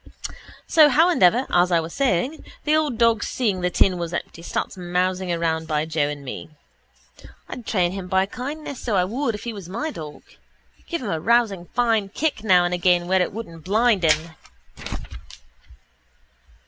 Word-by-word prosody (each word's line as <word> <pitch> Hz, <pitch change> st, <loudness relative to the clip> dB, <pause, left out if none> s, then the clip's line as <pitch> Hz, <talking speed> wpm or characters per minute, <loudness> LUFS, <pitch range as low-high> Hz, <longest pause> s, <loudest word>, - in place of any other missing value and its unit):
So 310 Hz, -2 st, +6 dB
howandever, 265 Hz, -, +4 dB
as 180 Hz, +1 st, +3 dB
I 170 Hz, -, +4 dB
was 165 Hz, 0 st, -5 dB
saying, 270 Hz, -, 0 dB, 0.2 s
the 305 Hz, 0 st, +2 dB
old 300 Hz, -6 st, 0 dB
dog 230 Hz, -1 st, +3 dB
seeing 205 Hz, -7 st, -1 dB
the 180 Hz, -, +1 dB
tin 180 Hz, +1 st, +2 dB
was 170 Hz, 0 st, -3 dB
empty 165 Hz, -, -6 dB
starts 170 Hz, -, -3 dB
mousing 180 Hz, 0 st, -1 dB
around 165 Hz, -1 st, -1 dB
by 155 Hz, -1 st, 0 dB
Joe 155 Hz, -2 st, 0 dB
and 145 Hz, -1 st, -7 dB
me. 135 Hz, -, -7 dB, 1.0 s
I'd 245 Hz, -, -8 dB
train 180 Hz, -4 st, +1 dB
him 190 Hz, -1 st, -6 dB
by 190 Hz, +1 st, +2 dB
kindness, 280 Hz, +5 st, -6 dB
so 225 Hz, -4 st, -1 dB
I 185 Hz, -, +3 dB
would, 230 Hz, +5 st, -1 dB
if 210 Hz, -, -9 dB
he 235 Hz, -, -4 dB
was 195 Hz, -5 st, -9 dB
my 310 Hz, +12 st, -3 dB
dog. 150 Hz, -, -9 dB, 0.6 s
Give 335 Hz, -5 st, -3 dB
him 210 Hz, -, -3 dB
a 160 Hz, -, -1 dB
rousing 205 Hz, -3 st, +1 dB
fine 225 Hz, -4 st, +2 dB
kick 285 Hz, 0 st, -2 dB
now 180 Hz, -4 st, +5 dB
and 175 Hz, -, -1 dB
again 175 Hz, 0 st, +2 dB
where 190 Hz, 0 st, +3 dB
it 180 Hz, -, 0 dB
wouldn't 170 Hz, -7 st, -8 dB
blind 215 Hz, +1 st, +2 dB
him. 160 Hz, +1 st, +2 dB
190 Hz, 175 wpm, -23 LUFS, 175-235 Hz, 1.0 s, So